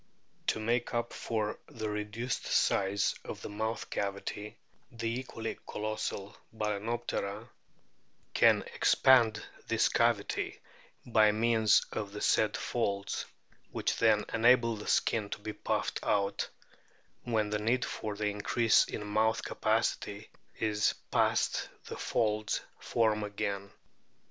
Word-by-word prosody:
To -, -, +1 dB
make 120 Hz, +2 st, 0 dB
up 120 Hz, 0 st, -1 dB
for 110 Hz, -2 st, -2 dB
the 110 Hz, -2 st, -5 dB
reduced 105 Hz, +4 st, -3 dB
size 100 Hz, +1 st, +2 dB
of -, -, -7 dB
the -, -, -5 dB
mouth 110 Hz, +2 st, -3 dB
cavity, 100 Hz, +1 st, -4 dB, 0.3 s
the 115 Hz, -1 st, -4 dB
equally 115 Hz, -3 st, -5 dB
colossal 105 Hz, -2 st, -4 dB, 0.2 s
Bal&noptera 110 Hz, 0 st, -3 dB, 0.8 s
can -, -, +5 dB
expand 115 Hz, -5 st, +4 dB, 0.2 s
this 115 Hz, -1 st, +3 dB
cavity 115 Hz, -3 st, +1 dB, 0.5 s
by 110 Hz, -3 st, +5 dB
means 110 Hz, 0 st, +3 dB
of 100 Hz, -2 st, -4 dB
the 105 Hz, -, -6 dB
said 110 Hz, -1 st, +3 dB
folds, 100 Hz, -4 st, -2 dB, 0.4 s
which -, -, -1 dB
then -, -, +4 dB
enable 115 Hz, 0 st, +4 dB
the 105 Hz, -, -8 dB
skin 105 Hz, -3 st, +1 dB
to -, -, -4 dB
be 105 Hz, +1 st, -5 dB
puffed -, -, -1 dB
out; 100 Hz, -1 st, 0 dB, 0.7 s
when 110 Hz, -3 st, 0 dB
the 105 Hz, -, 0 dB
need 120 Hz, +4 st, +1 dB
for 105 Hz, -2 st, -4 dB
the 105 Hz, +1 st, -2 dB
increase 105 Hz, +3 st, +3 dB
in 105 Hz, -, -5 dB
mouth 110 Hz, +2 st, +1 dB
capacity -, -, -1 dB, 0.3 s
is 105 Hz, -1 st, +1 dB, 0.2 s
passed -, -, +2 dB, 0.2 s
the -, -, -6 dB
folds 110 Hz, -2 st, 0 dB, 0.2 s
form 110 Hz, -2 st, +1 dB
again. 100 Hz, -1 st, -3 dB
110 Hz, 120 wpm, -31 LUFS, 105-115 Hz, 0.8 s, can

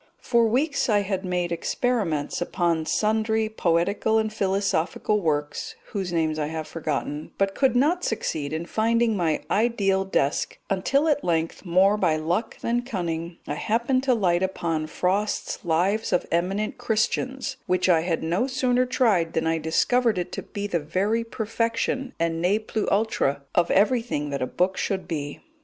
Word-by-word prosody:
For 235 Hz, -2 st, +3 dB
weeks 280 Hz, +5 st, +1 dB
I 205 Hz, -2 st, +3 dB, 0.2 s
made 180 Hz, -2 st, -1 dB
experiments 170 Hz, -, -1 dB
upon 170 Hz, -3 st, 0 dB
sundry 220 Hz, +1 st, +1 dB
poetical 200 Hz, +3 st, +1 dB
and 220 Hz, -1 st, 0 dB
philosophical 195 Hz, +1 st, 0 dB
works, 150 Hz, -3 st, -2 dB, 0.2 s
whose 190 Hz, -4 st, -3 dB
names 160 Hz, -2 st, 0 dB
I 150 Hz, -, -1 dB
have 160 Hz, 0 st, -5 dB
forgotten, 150 Hz, -1 st, -4 dB
but 195 Hz, 0 st, +1 dB
could 260 Hz, 0 st, +2 dB
not 320 Hz, +8 st, +2 dB
succeed 155 Hz, -10 st, -2 dB
in 160 Hz, +2 st, -3 dB
finding 230 Hz, +2 st, +1 dB
my 165 Hz, -5 st, 0 dB
ideal 200 Hz, -4 st, +2 dB
desk, 150 Hz, -7 st, 0 dB
until 275 Hz, +11 st, +2 dB
at 290 Hz, -2 st, +2 dB
length, 165 Hz, +2 st, -1 dB
more 190 Hz, +4 st, +4 dB
by 175 Hz, -6 st, +2 dB
luck 170 Hz, +8 st, -2 dB
than 240 Hz, +1 st, 0 dB
cunning, 170 Hz, -7 st, -4 dB
I -, -, -3 dB
happened 240 Hz, +4 st, +1 dB
to 255 Hz, -2 st, +4 dB
light 180 Hz, -5 st, +2 dB
upon 165 Hz, -4 st, -1 dB
Frost's 195 Hz, +8 st, -1 dB
Lives 185 Hz, +6 st, +1 dB
of 180 Hz, -, +1 dB
Eminent 195 Hz, +7 st, -1 dB
Christians, 255 Hz, +3 st, -1 dB
which 185 Hz, 0 st, +2 dB
I 170 Hz, -3 st, +4 dB
had 165 Hz, -1 st, -1 dB
no 175 Hz, +10 st, 0 dB
sooner 255 Hz, -1 st, +1 dB
tried 205 Hz, -10 st, +2 dB
than 160 Hz, -, 0 dB
I 165 Hz, 0 st, +1 dB
discovered 220 Hz, +8 st, +2 dB
it 180 Hz, -, -3 dB
to -, -, -4 dB
be 205 Hz, 0 st, -6 dB
the 180 Hz, -4 st, 0 dB
very 195 Hz, +9 st, 0 dB
perfection 230 Hz, +4 st, -2 dB
and 165 Hz, 0 st, 0 dB
ne 185 Hz, +4 st, +3 dB
plus 215 Hz, 0 st, -3 dB
ultra 195 Hz, -10 st, +1 dB
of 170 Hz, -, +2 dB
everything 210 Hz, -, +1 dB
that 140 Hz, -, -3 dB
a 130 Hz, -, 0 dB
book 185 Hz, +6 st, 0 dB
should 190 Hz, -1 st, -2 dB
be. 145 Hz, -3 st, -4 dB
195 Hz, 160 wpm, -25 LUFS, 165-225 Hz, 0.2 s, more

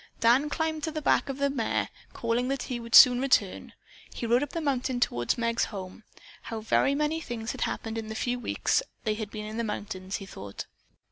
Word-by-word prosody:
Dan 250 Hz, +6 st, +4 dB
climbed 315 Hz, 0 st, -1 dB
to 320 Hz, -, -3 dB
the 310 Hz, -, -3 dB
back 290 Hz, -, +2 dB
of 270 Hz, -, -3 dB
the 280 Hz, 0 st, +1 dB
mare. 240 Hz, -5 st, -1 dB, 0.2 s
Calling 235 Hz, +2 st, -1 dB
that 275 Hz, -1 st, -1 dB
he 245 Hz, -2 st, -4 dB
would 230 Hz, 0 st, -1 dB
soon 250 Hz, 0 st, +9 dB
return, 240 Hz, -8 st, +1 dB, 0.4 s
he -, -, -5 dB
rode 240 Hz, +2 st, +3 dB
up 290 Hz, -, -2 dB
the 335 Hz, -, -3 dB
mountain 265 Hz, -4 st, -1 dB
toward 120 Hz, -, 0 dB
Meg's 230 Hz, 0 st, +1 dB
home. 190 Hz, +1 st, -8 dB, 0.4 s
How 225 Hz, -, -5 dB
very 250 Hz, +5 st, +2 dB
many 300 Hz, +2 st, 0 dB
things 230 Hz, -5 st, -4 dB
had -, -, -8 dB
happened 225 Hz, 0 st, -2 dB
in 220 Hz, -, -6 dB
the 220 Hz, -, -5 dB
few 245 Hz, +2 st, -1 dB
weeks 245 Hz, -, +1 dB, 0.2 s
they 215 Hz, -, +1 dB
had 215 Hz, -1 st, -5 dB
been 210 Hz, 0 st, -6 dB
in 215 Hz, +1 st, -6 dB
the 235 Hz, -, 0 dB
mountains, 195 Hz, -3 st, -4 dB
he 195 Hz, -, -5 dB
thought. 100 Hz, -, -8 dB
235 Hz, 215 wpm, -28 LUFS, 220-275 Hz, 0.4 s, soon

